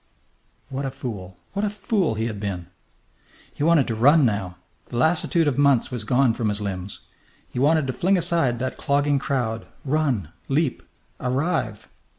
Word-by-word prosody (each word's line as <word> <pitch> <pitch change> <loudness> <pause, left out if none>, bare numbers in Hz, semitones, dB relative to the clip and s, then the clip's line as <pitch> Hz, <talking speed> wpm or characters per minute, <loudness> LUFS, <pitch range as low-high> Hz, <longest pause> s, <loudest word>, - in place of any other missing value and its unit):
What 135 0 -3
a 135 - -1
fool! 95 -9 -7 0.2
What 200 +1 -1
a 210 - +2
fool 200 - 0
he 110 +1 -1
had 110 -3 -4
been! 95 -4 -4 0.9
He - - -9
wanted 155 -3 +4
to 115 - -2
run 140 +7 +5
now. 100 -5 -1 0.3
The 120 - -5
lassitude 160 +3 +2
of 140 -1 0
months 140 -4 +4
was 120 -4 -4
gone 125 0 +3
from 115 -2 -1
his 105 0 -1
limbs. 95 -1 -5 0.5
He - - -5
wanted 150 +2 +3
to 130 - -2
fling 185 +9 +2
aside 165 -8 +2
that 130 +2 -3
clogging 145 0 +1
crowd, 120 -5 -2 0.2
run, 135 - 0 0.2
leap, 140 -1 +1 0.4
arrive. 130 - -1
130 Hz, 165 wpm, -24 LUFS, 110-155 Hz, 0.9 s, run